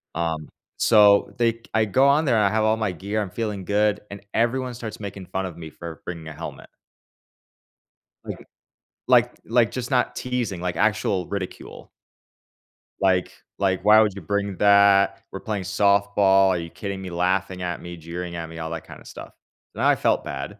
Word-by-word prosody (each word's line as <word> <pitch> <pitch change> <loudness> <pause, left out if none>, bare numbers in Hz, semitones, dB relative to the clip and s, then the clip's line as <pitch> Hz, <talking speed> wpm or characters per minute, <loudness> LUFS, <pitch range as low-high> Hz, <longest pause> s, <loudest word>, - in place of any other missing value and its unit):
um, 80 -2 -2 0.3
so 105 -2 +5
they 115 -1 +1
I 110 0 +3
go 130 +6 +3
on 145 +3 +3
there, 120 -5 +3
I 105 -2 +3
have 110 +1 +1
all 110 +1 +2
my 110 -3 -1
gear, 100 +5 -3
I'm 100 -3 -5
feeling 105 -4 -4
good, 105 +1 +1
and 100 - -8
everyone 125 +2 0
starts 115 -3 -7
making 100 -2 -7
fun 95 +1 -3
of 85 -3 -10
me 80 -2 -8
for 85 +1 -9
bringing 85 -3 -7
a 80 - -7
helmet. 80 +2 -8 1.6
Like - - -8 0.6
like - - +5
like, 115 -1 +2
just 125 0 -5
not 125 - +1
teasing, 125 -8 -3
like, 90 -1 -2
actual 105 -2 0
ridicule. 100 -2 -7 1.1
Like 95 -2 +2 0.3
like, 95 -2 0
"Why 110 +1 +8
would 105 -2 +2
you 100 - -7
bring 100 +2 -2
that? 100 -1 +5
We're - - -6
playing 105 -3 -4
softball. 100 0 +3
Are 90 - +1
you 85 -1 -6
kidding 100 +2 -6
me?" 95 - -6
Laughing 90 +1 -1
at 90 -1 -4
me, 85 0 -8
jeering 85 +2 -6
at 80 -1 -5
me, 80 - -10
all 80 0 -4
that 80 -1 -6
kinda - - -12
stuff? - - -10 0.4
Then - - -3
I - - +5
felt - - +1
bad. - - -6
100 Hz, 185 wpm, -23 LUFS, 90-110 Hz, 1.6 s, Why